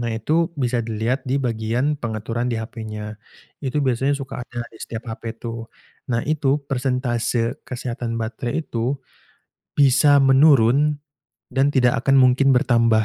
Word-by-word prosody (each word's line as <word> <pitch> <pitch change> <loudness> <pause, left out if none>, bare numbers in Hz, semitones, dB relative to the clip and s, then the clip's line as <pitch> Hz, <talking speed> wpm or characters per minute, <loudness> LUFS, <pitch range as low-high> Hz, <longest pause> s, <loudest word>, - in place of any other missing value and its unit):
nah, 120 - -2
itu 155 +10 +1
bisa 125 -2 0
dilihat 115 +4 -1
di 130 - +1
bagian 120 +3 0
pengaturan 115 +1 -3
di 115 - -1
HP-nya. 110 -2 -6 0.5
Itu 135 +1 -1
biasanya 135 +2 +1
suka 135 -2 -6
ada 120 0 -6
di 110 - -15
setiap 115 0 -6
HP 115 0 -6
tuh, 115 -1 -6 0.4
nah, 115 -1 0
itu 145 -2 +1
persentase 125 -3 -1
kesehatan 120 -2 -4
baterai 120 +6 -3
itu 120 +4 -2 0.8
bisa 140 +1 +5
menurun 135 +1 +5 0.6
dan 135 +1 +2
tidak 125 -3 +3
akan 135 0 +4
mungkin 130 +2 +4
bertambah. 115 -3 +3
125 Hz, 140 wpm, -22 LUFS, 115-135 Hz, 0.8 s, bisa